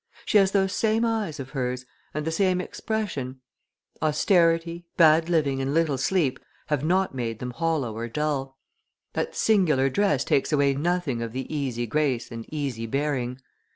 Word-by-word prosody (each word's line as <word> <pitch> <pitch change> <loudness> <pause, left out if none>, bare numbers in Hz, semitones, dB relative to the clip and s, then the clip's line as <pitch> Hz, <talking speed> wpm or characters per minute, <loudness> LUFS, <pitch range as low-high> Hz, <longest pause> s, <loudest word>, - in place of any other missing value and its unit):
She 210 - +5
has 195 -1 +4
those 195 -1 +1
same 220 +2 +2
eyes 220 -10 -1
of 135 0 -7
hers, 125 -2 -2 0.3
and 150 0 -3
the 160 - -1
same 185 +1 +2
expression; 180 - -3 0.6
austerity; 165 +2 +2
bad 160 0 +5
living, 145 -5 +1
and 135 +2 -1
little 155 -5 +2
sleep 135 -3 +1 0.3
have 150 -2 0
not 185 +2 +1
made 115 -3 -3
them 125 +2 -5
hollow 155 -7 -1
or 115 +1 -4
dull; 135 0 -2 0.6
that - - -2
singular 155 -11 +3
dress 150 -7 +2
takes 140 - +1
away 140 -2 +3
nothing 150 -4 -1
of 115 -1 -4
the 130 0 -3
easy 125 -5 -2
grace 130 0 0
and 115 -1 -8
easy 135 -7 -3
bearing. 130 -1 -2
150 Hz, 160 wpm, -25 LUFS, 130-175 Hz, 0.6 s, She